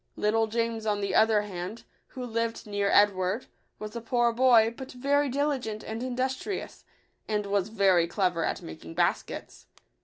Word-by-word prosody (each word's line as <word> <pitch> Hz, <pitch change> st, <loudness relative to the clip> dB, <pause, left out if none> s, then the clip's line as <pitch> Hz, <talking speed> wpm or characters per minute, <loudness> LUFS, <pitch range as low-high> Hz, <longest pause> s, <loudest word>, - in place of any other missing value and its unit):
Little 220 Hz, +1 st, +1 dB
James, 230 Hz, 0 st, -2 dB
on 205 Hz, -1 st, +1 dB
the 200 Hz, -1 st, -2 dB
other 220 Hz, -1 st, +4 dB
hand, 190 Hz, +2 st, -6 dB, 0.2 s
who 255 Hz, -1 st, -7 dB
lived 230 Hz, -1 st, -2 dB
near 205 Hz, -1 st, -1 dB
Edward, 200 Hz, +2 st, +3 dB, 0.3 s
was 215 Hz, +1 st, -7 dB
a 235 Hz, -, -4 dB
poor 235 Hz, 0 st, +1 dB
boy, 235 Hz, -2 st, +5 dB
but 265 Hz, +1 st, -8 dB
very 280 Hz, +3 st, +1 dB
diligent 260 Hz, -6 st, -1 dB
and 220 Hz, +1 st, -5 dB
industrious, 260 Hz, +9 st, -3 dB, 0.4 s
and 210 Hz, -1 st, -1 dB
was 200 Hz, 0 st, 0 dB
very 190 Hz, -5 st, +3 dB
clever 175 Hz, -2 st, 0 dB
at -, -, -2 dB
making 80 Hz, +1 st, -9 dB
baskets. -, -, -2 dB
220 Hz, 155 wpm, -28 LUFS, 200-245 Hz, 0.4 s, boy